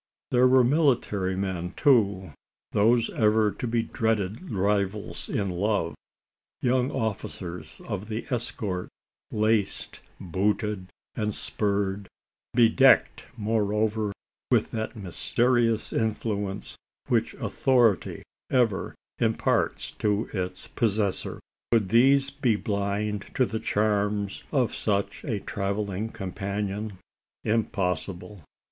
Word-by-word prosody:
There 125 +1 +5
were 130 0 +6
military 120 - +2
men 95 -2 -3
too 100 - +3 0.4
those 115 +3 +3
ever 110 -1 +3
to 125 - -4
be 115 0 +1
dreaded 110 - -1
rivals 100 0 -1
in 100 -2 -1
love 95 -2 0 0.7
young 125 +1 +2
officers 95 -5 -4
of 105 +2 -4
the 110 +1 -3
escort, 105 -6 -3 0.4
laced, 110 -1 0 0.2
booted, 100 +2 -1 0.3
and 105 -1 -2
spurred 100 -1 -1 0.5
bedecked, 125 +3 +5
moreover, 105 0 0 0.4
with - - +2
that 110 +1 -3
mysterious 115 - +1
influence 105 -3 -2 0.3
which - - +1
authority 120 -7 +2 0.3
ever 120 -6 +1 0.2
imparts - - +1
to 105 +1 -1
its 90 -1 -3
possessor. 105 -3 -1 0.3
Could 110 -5 +3
these 135 +5 +5
be 135 -5 +1
blind 105 0 -2
to 130 - +4
the 110 -1 -3
charms 105 -1 0
of 130 -5 +1
such 100 -2 -1
a 110 -9 -2
travelling 100 0 -2
companion? 100 0 -4 0.5
Impossible. 95 -3 -1
105 Hz, 100 wpm, -27 LUFS, 100-115 Hz, 0.7 s, were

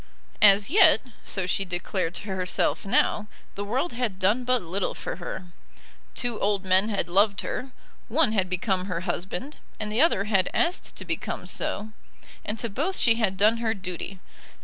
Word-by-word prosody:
As 205 +3 +6
yet, 390 +1 +7 0.2
so 190 -2 -2
she 190 +2 +1
declared 180 -1 -2
to - - -4
herself 190 +1 0
now, 210 +1 +2 0.3
the 200 - -4
world 255 +12 -1
had 235 -5 -2
done 205 +7 +2
but 250 -3 +2
little 185 +3 -2
for - - -5
her. 180 +1 -6 0.7
Two 240 -3 -2
old 200 -1 0
men 190 +3 +3
had 205 - -1
loved 200 +3 +3
her; 260 +1 -4 0.4
one 275 0 +3
had 190 -4 0
become 185 0 0
her 180 -3 -3
husband, 230 +11 -4 0.2
and 210 -1 -2
the 225 +5 +2
other 315 - +4
had 195 -3 +2
asked 350 +1 0
to - - -6
become - - -4
so; 215 +2 -2 0.5
and 210 - -3
to 235 - -2
both 295 - -2
she 230 - +5
had 200 -5 0
done 215 +4 +4
her 225 -1 0
duty. 185 0 -6
205 Hz, 175 wpm, -26 LUFS, 190-230 Hz, 0.7 s, yet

